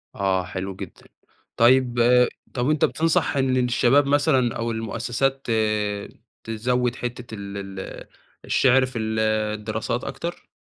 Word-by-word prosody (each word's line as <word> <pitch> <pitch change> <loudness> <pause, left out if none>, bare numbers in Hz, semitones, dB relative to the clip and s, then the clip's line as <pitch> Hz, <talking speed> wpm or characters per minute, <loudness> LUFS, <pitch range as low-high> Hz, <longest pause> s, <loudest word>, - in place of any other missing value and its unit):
آه، 95 -2 +1
حلو 95 +1 -5
جدًا، - - -10 0.5
طيب 125 +1 +4 0.6
طَب 125 +3 0
أنتَ 155 -1 +3
بتنصح 160 -3 +1
إن 130 -1 +2
الشباب 125 +3 +3
مثلًا 140 -4 +2
أو 115 0 -2
المؤسسات 120 +4 -2 1.0
تزوِد 120 +2 -1
حتة 120 -2 -6
ال 100 0 -7 0.2
ال - - -8 0.4
الشِعر 130 0 +4
في 125 -3 -6
الدراسات 110 +1 -1
أكتر؟ 170 +1 -6
120 Hz, 115 wpm, -23 LUFS, 110-130 Hz, 1.0 s, طيب